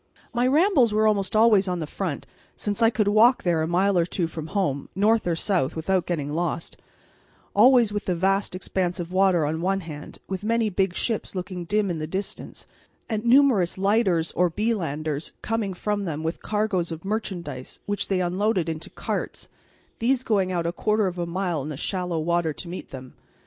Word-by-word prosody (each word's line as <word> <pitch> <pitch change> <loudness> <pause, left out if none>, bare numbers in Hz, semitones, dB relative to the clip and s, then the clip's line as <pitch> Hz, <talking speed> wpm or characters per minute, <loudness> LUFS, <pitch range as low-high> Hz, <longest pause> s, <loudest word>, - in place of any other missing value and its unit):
My 245 +1 +2
rambles 280 - +4
were 215 0 +3
almost 200 -2 +1
always 215 -3 +5
on 180 -1 -1
the 160 - -2
front, 160 -1 -4 0.3
since 205 +1 -3
I 225 - +6
could 215 -3 0
walk 225 +5 +5
there 170 -3 +2
a 160 - 0
mile 185 +2 +2
or 170 - +3
two 180 -1 -1
from 160 -1 -6
home, 170 -8 -1
north 215 +1 +2
or 170 - +1
south, 170 -5 0
without 180 +3 0
getting 150 -4 -2
lost, 170 0 -2 0.8
always 235 0 +6
with 205 - -3
the 180 - 0
vast 195 +2 0
expanse 185 -1 -2
of 175 0 -5
water 185 -4 +3
on 160 +2 -2
one 195 +2 0
hand, 150 -3 -9
with 190 0 -4
many 225 0 +1
big 190 -1 0
ships 225 -2 -2
looking 180 -1 -5
dim 205 +1 +1
in 165 - -3
the 155 - -3
distance, 190 +5 -5 0.4
and 220 0 -3
numerous 235 -9 +4
lighters 195 -4 +2
or 180 +1 +2
belanders 160 -7 -2
coming 225 -3 -1
from 205 +1 -2
them 155 -2 -4
with 160 +1 -3
cargoes 210 -5 -1
of 165 +3 -7
merchandise 175 - -4
which 205 0 -2
they 190 -2 +1
unloaded 185 0 0
into 160 0 -4
carts, - - -4 0.5
these 255 +2 +1
going 195 -6 +1
out 170 -2 -1
a 170 - 0
quarter 210 +4 +1
of 180 -1 -3
a 170 - -2
mile 175 -3 -1
in 145 - -5
the 150 - -5
shallow 180 0 -2
water 165 0 0
to 170 - -9
meet 175 +2 -7
them. 130 -1 -9
185 Hz, 195 wpm, -25 LUFS, 170-210 Hz, 0.8 s, I